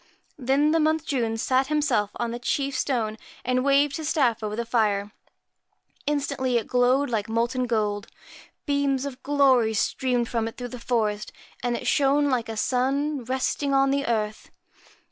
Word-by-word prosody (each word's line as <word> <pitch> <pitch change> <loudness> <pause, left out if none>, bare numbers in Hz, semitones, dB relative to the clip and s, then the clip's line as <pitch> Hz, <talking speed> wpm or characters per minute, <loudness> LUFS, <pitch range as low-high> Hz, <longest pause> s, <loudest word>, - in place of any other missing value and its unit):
Then 275 +4 +2
the 325 - +3
Month 315 0 +1
June 230 -5 -1
sat 260 +3 +1
himself 285 -9 +1
on 235 -1 -2
the 240 - -5
chief 275 +3 -1
stone, 230 -5 -1 0.3
and 255 0 +1
waved 280 0 +3
his 315 -2 -3
staff 245 -8 +2
over 210 -1 -3
the 235 +1 -3
fire. 210 -3 +1 1.0
Instantly 280 -4 0
it 230 - -1
glowed 250 +2 +2
like 220 -1 -1
molten 240 +3 0
gold, 210 -3 -1 0.6
beams 280 -2 0
of 270 -2 -7
glory 260 -6 +3
streamed 245 +1 0
from 230 -1 -1
it 225 - -8
through 245 -1 -5
the 250 - -6
forest, 215 -3 -1 0.3
and 240 0 -1
it - - -8
shone 285 0 +3
like 235 -3 -1
a 220 - -5
sun 270 +4 0
resting 265 +2 -1
on 270 0 +4
the 280 0 0
earth. 215 -2 -2
255 Hz, 165 wpm, -25 LUFS, 230-280 Hz, 1.0 s, on